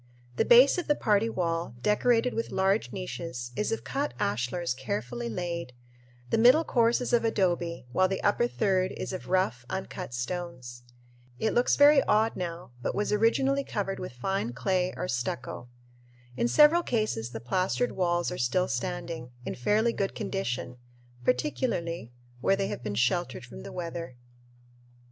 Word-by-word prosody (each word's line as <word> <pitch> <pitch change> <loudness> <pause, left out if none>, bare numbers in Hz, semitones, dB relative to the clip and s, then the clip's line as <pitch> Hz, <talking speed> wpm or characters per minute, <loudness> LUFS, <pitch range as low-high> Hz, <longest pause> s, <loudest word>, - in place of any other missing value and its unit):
The - - +3
base 255 +8 +7
of 355 - -5
the 295 - +3
party 215 -2 +2
wall, 170 - -2
decorated 235 +3 +2
with 230 - -2
large 195 +3 +1
niches, 165 -9 -5
is 210 - -1
of 225 - -2
cut 285 +2 -2
ashlars 125 - -1
carefully 120 -2 -4
laid; 170 +1 -4 0.6
the - - +3
middle 250 +8 +7
course 235 -4 +2
is 245 - -3
of 235 - +4
adobe, 175 - 0
while 185 +7 +3
the 190 0 -3
upper 240 +4 +3
third 190 -5 +1
is - - -5
of 185 - -6
rough, 185 -10 +1
uncut 185 -7 -5
stones. 125 -3 -5 0.6
It 220 - 0
looks 245 - +3
very 285 0 +7
odd 220 +2 +2
now 170 -5 -5
but - - -2
was 210 0 0
originally 270 +6 +2
covered 195 -6 -3
with 180 - -6
fine 125 0 -2
clay 185 +7 0
or 180 - -3
stucco. 125 -1 -4 0.7
In 235 - +1
several 300 +6 +6
cases 215 - -1
the 115 -2 -6
plastered 185 - 0
walls 175 -2 0
are 180 - -5
still 155 +10 +1
standing, 165 0 -4 0.2
in - - -3
fairly 215 - +1
good 195 -1 -2
condition, 125 -9 -3 0.5
particularly 175 - -1 0.3
where 195 +10 +3
they 195 0 -1
have - - -5
been 105 -3 -4
sheltered 125 - 0
from 65 0 -10
the - - -8
weather. 170 -5 -5
185 Hz, 160 wpm, -28 LUFS, -, 0.7 s, base